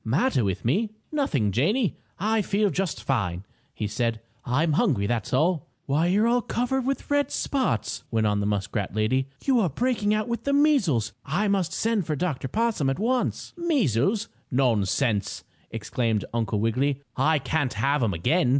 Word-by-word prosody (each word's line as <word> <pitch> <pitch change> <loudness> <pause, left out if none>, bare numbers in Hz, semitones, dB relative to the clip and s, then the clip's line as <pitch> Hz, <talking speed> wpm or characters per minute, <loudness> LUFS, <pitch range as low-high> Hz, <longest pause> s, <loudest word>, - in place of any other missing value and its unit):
"Matter 130 - +1
with 95 0 -2
me? 205 - +1 0.2
Nothing, 150 - +1
Janie! 185 - +1 0.2
I 215 +3 +1
feel 205 0 +1
just 190 -3 -2
fine!" 100 -8 -1 0.3
he 110 - -4
said. 115 +2 -1 0.2
"I'm 150 +6 +1
hungry, 145 - +2
that's 110 -1 -2
all!" 155 +4 +1 0.2
"Why, 150 +5 +1
you're 205 +5 +3
all 245 +1 +3
covered 250 +3 -1
with 275 +1 -2
red 285 0 +2
spots!" 270 -3 -1
went 110 -2 +1
on 105 -1 +2
the 100 - 0
muskrat 105 0 -2
lady. 130 +5 +1 0.2
"You 265 -3 +4
are 190 -6 +2
breaking 220 - 0
out 215 0 +1
with 235 0 -3
the 280 - 0
measles. 200 - +3
I 185 +9 0
must 190 -4 +1
send 220 -5 0
for 155 - 0
Dr. 145 -4 -2
Possum 220 - 0
at 135 - -1
once." 245 +5 -1
"Measles? 225 - +1 0.2
Nonsense!" 115 -3 +1 0.3
exclaimed 115 -4 -1
Uncle 110 -3 0
Wiggily. 130 +6 0
"I 155 +4 +3
can't 145 -1 -1
have 140 +6 +1
'em 105 -6 +1
again. 140 - +2
150 Hz, 170 wpm, -25 LUFS, -, 0.3 s, You